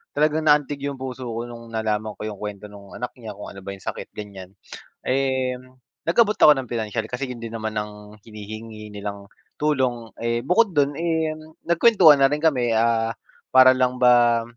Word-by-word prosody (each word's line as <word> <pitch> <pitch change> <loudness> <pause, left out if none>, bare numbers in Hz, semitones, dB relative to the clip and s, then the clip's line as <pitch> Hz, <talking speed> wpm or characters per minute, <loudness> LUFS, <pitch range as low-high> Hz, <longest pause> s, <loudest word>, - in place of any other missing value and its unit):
talagang 155 +1 +1
naantig 145 -1 +3
yung 140 - -4
puso 130 -1 -6
ko 115 0 -4
nung 115 -1 -10
nalaman 110 -1 -2
ko - - -9
yung 105 -2 -6
kuwento 105 0 -7
no'ng 100 -1 -13
anak 125 0 -5
niya, 110 -3 -8
kung 105 - -9
ano 100 - -11
ba 100 +1 -7
yung 95 - -17
sakit - - -6
ganyan. 100 -2 -9 0.5
Eh, 130 -1 0 0.5
nag-abot 210 +4 +3
ako 150 - +7
ng 130 -3 -6
pinansiyal, 110 -1 -3
kasi 130 +2 -3
hindi 115 -2 -7
naman 110 -1 -4
ng 105 0 -7
hinihingi 110 0 -9
nilang 100 -1 -6 0.3
tulong, 130 -6 0
eh, 115 0 0
bukod 205 +2 +3
dun 145 -2 +1
eh, 160 -1 -1 0.3
nagkuwentuhan 170 -5 +6
na 135 - +5
rin 150 - 0
kami, 125 -7 +2
ah, 115 0 +2 0.4
para 130 0 +7
lang 125 0 0
ba 120 -2 +5
120 Hz, 175 wpm, -23 LUFS, 110-140 Hz, 0.5 s, ako